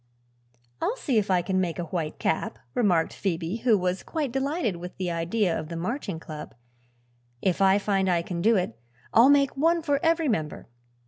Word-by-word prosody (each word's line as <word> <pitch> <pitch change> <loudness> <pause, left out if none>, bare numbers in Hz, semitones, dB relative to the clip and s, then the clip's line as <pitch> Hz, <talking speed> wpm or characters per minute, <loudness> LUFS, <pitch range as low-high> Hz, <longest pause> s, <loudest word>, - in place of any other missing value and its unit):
"I'll 470 - 0
see 265 - +1
if 205 - -3
I 180 -2 +3
can 185 +1 0
make 170 -3 -2
a 175 - -2
white 165 -2 -3
cap," - - -1 0.2
remarked 180 -8 +2
Phoebe, 175 +1 -2
who 230 -2 +3
was 180 0 -1
quite 300 -6 -3
delighted 270 - -1
with 180 +1 -8
the 185 -2 -2
idea 170 +3 0
of 155 - -5
the 170 - -5
Marching 195 - -3
Club. 155 -2 -9 0.8
"If 190 +5 0
I 195 0 +5
find 195 -2 +1
I 170 -2 +2
can 170 -1 -4
do 225 +4 +4
it, 180 - -1 0.3
I'll 235 +4 +7
make 280 -1 +4
one 330 +4 +2
for 285 -3 +1
every 325 -1 +2
member." 160 - -2
190 Hz, 190 wpm, -26 LUFS, 170-255 Hz, 0.8 s, I'll